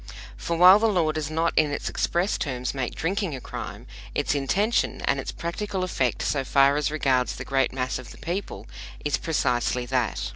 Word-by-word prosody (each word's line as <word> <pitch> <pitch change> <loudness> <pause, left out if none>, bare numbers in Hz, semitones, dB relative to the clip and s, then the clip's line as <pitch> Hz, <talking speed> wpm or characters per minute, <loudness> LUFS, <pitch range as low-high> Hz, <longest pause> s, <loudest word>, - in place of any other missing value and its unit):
For 170 - -3
while 185 +4 +9
the 225 - +3
law 175 -7 +2
does 155 -1 -3
not 165 +2 0
in 155 -1 +4
its 145 - -3
express 175 +4 0
terms 125 -6 -2
make 130 -3 -3
drinking 185 -1 -1
a - - -6
crime, - - -7 0.3
its - - +1
intention 195 - 0
and - - +1
its - - -4
practical 190 +3 -3
effect 130 -9 -1
so 140 -2 0
far 140 +1 +4
as 150 0 0
regards 135 -5 +1
the - - -7
great 135 -1 +1
mass 130 -1 -2
of 125 - -10
the - - -12
people 170 - -5 0.4
is 145 - +1
precisely 125 -5 0
that. 125 -2 -1
150 Hz, 190 wpm, -25 LUFS, 130-175 Hz, 0.4 s, while